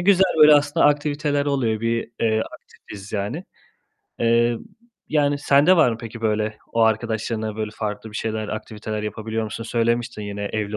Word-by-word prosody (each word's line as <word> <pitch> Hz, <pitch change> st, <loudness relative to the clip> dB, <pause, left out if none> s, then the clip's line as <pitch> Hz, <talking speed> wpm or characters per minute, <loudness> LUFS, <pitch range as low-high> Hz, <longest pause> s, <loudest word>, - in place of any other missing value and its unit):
güzel, 190 Hz, +1 st, +5 dB, 0.2 s
böyle, 150 Hz, 0 st, +9 dB
aslında 145 Hz, 0 st, +3 dB
aktiviteler 145 Hz, 0 st, +1 dB
oluyor. 120 Hz, -6 st, 0 dB
Bir, 115 Hz, 0 st, -1 dB
eee, 110 Hz, -1 st, +2 dB
aktifiz 100 Hz, -1 st, -13 dB
yani. 105 Hz, -, -3 dB, 0.8 s
Eee, 115 Hz, 0 st, +3 dB, 0.5 s
yani 145 Hz, -2 st, +2 dB
sende 145 Hz, +5 st, +4 dB
var 155 Hz, -7 st, +5 dB
mı 115 Hz, -, -3 dB
peki, 115 Hz, 0 st, -8 dB
böyle, 110 Hz, -1 st, 0 dB, 0.2 s
o 115 Hz, -, +1 dB
arkadaşlarınla, 110 Hz, -1 st, 0 dB
böyle 110 Hz, -1 st, -3 dB
farklı 105 Hz, 0 st, -5 dB
bir 105 Hz, -, -7 dB
şeyler, 110 Hz, -1 st, -3 dB
aktiviteler 110 Hz, 0 st, -5 dB
yapabiliyor 110 Hz, +1 st, -3 dB
musun? 110 Hz, +2 st, -6 dB
Söylemiştin 120 Hz, 0 st, -1 dB
yine 100 Hz, 0 st, -5 dB
evli 105 Hz, 0 st, -3 dB
115 Hz, 155 wpm, -22 LUFS, 110-140 Hz, 0.8 s, böyle